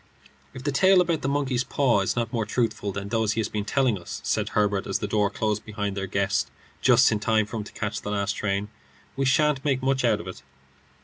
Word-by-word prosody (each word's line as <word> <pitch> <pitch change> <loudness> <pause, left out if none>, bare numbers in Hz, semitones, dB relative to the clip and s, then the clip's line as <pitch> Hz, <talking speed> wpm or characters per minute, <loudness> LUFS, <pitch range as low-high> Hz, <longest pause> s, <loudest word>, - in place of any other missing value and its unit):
"If 130 - -8
the 145 - 0
tale 190 +7 +5
about 170 -3 +1
the - - -2
monkey's 135 -3 0
paw 130 -4 +2
is 95 - 0
not 115 -1 -2
more 115 -2 0
truthful 110 -2 -1
than 100 +1 -5
those 110 -1 +1
he - - -2
has 110 - -1
been 105 -1 -3
telling 125 -3 +1
us," 85 - -7
said - - 0
Herbert, 105 -2 0
as - - 0
the - - -4
door 105 -1 +1
closed 105 0 -2
behind 105 -2 -4
their 95 -1 -3
guest, 95 -3 0 0.3
just 125 -1 +5
in 105 - 0
time 110 0 +2
for 115 - -6
him 105 - -3
to - - -11
catch 105 -2 -3
the - - -5
last 100 -1 0
train, 100 0 -2 0.5
"we 135 - 0
sha'nt 150 0 +2
make 135 -3 0
much 130 -1 +1
out 115 -4 +3
of 85 - -8
it." 95 - -8
110 Hz, 240 wpm, -25 LUFS, 100-130 Hz, 0.5 s, tale